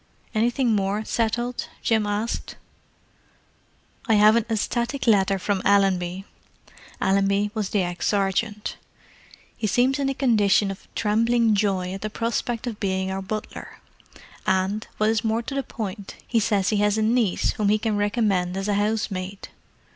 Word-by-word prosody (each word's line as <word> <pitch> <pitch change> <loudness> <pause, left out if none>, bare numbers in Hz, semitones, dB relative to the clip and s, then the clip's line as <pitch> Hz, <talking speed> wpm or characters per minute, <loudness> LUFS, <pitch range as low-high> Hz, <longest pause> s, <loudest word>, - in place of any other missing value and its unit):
"Anything 235 +1 +2
more 200 +2 -1
settled?" 240 +2 -1 0.2
Jim 220 -2 +2
asked. 210 +3 -3 1.5
"I 225 - +4
have 210 +1 +6
an 235 -1 +1
ecstatic 235 +4 -1
letter 195 -3 +3
from 190 0 -1
Allenby." 190 -2 +2 0.7
Allenby 200 +1 +2
was 215 -3 -2
the 200 -3 +1
ex 175 -1 -3
sergeant. 205 +1 -1 0.8
"He 215 - -2
seems 255 +6 +2
in 275 -1 +1
a 270 - -2
condition 210 -6 +3
of 195 - -10
trembling 230 +1 +2
joy 195 -3 0
at 195 - -6
the 215 - -3
prospect 230 +1 -2
of 230 -4 -5
being 190 -1 -1
our 190 0 -3
butler; 215 +2 -6 0.7
and, 190 +3 0
what 215 +1 +2
is 225 0 0
more 225 +1 0
to 275 - -6
the 275 - 0
point, 205 -5 -6
he 230 - +2
says 200 -3 +1
he 215 - +1
has 210 +1 +2
a 220 - +1
niece 225 -3 +2
whom 210 -2 0
he 210 - +4
can 215 0 -1
recommend 205 -3 0
as 195 +1 -3
a 205 - +1
housemaid. 200 -2 -2
210 Hz, 155 wpm, -24 LUFS, 195-225 Hz, 1.5 s, have